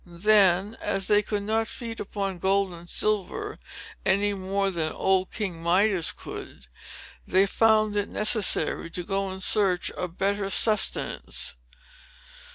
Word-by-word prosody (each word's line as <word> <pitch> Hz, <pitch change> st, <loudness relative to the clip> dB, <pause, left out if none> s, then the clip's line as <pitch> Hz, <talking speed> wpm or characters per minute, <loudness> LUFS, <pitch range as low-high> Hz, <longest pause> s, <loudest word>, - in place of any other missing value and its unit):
Then, 195 Hz, +2 st, +3 dB
as 195 Hz, -1 st, 0 dB
they 205 Hz, +1 st, +3 dB
could 205 Hz, -1 st, -3 dB
not 220 Hz, +2 st, 0 dB
feed 230 Hz, -2 st, -7 dB
upon 195 Hz, -2 st, -4 dB
gold 195 Hz, 0 st, +1 dB
and 170 Hz, 0 st, -11 dB
silver 215 Hz, -, 0 dB, 0.4 s
any 200 Hz, +1 st, +1 dB
more 195 Hz, 0 st, -1 dB
than 160 Hz, -3 st, -2 dB
old 190 Hz, -1 st, 0 dB
King 185 Hz, -7 st, -4 dB
Midas 180 Hz, +1 st, +2 dB
could, 65 Hz, -, -10 dB, 0.6 s
they 190 Hz, +1 st, +3 dB
found 215 Hz, +1 st, +2 dB
it 205 Hz, -1 st, -1 dB
necessary 210 Hz, -5 st, 0 dB
to 175 Hz, +2 st, -5 dB
go 195 Hz, +1 st, -2 dB
in 190 Hz, 0 st, -7 dB
search 190 Hz, -3 st, +2 dB
of 180 Hz, -1 st, -6 dB
better 200 Hz, 0 st, -1 dB
sustenance. 215 Hz, +1 st, 0 dB
195 Hz, 135 wpm, -25 LUFS, 185-210 Hz, 0.6 s, Then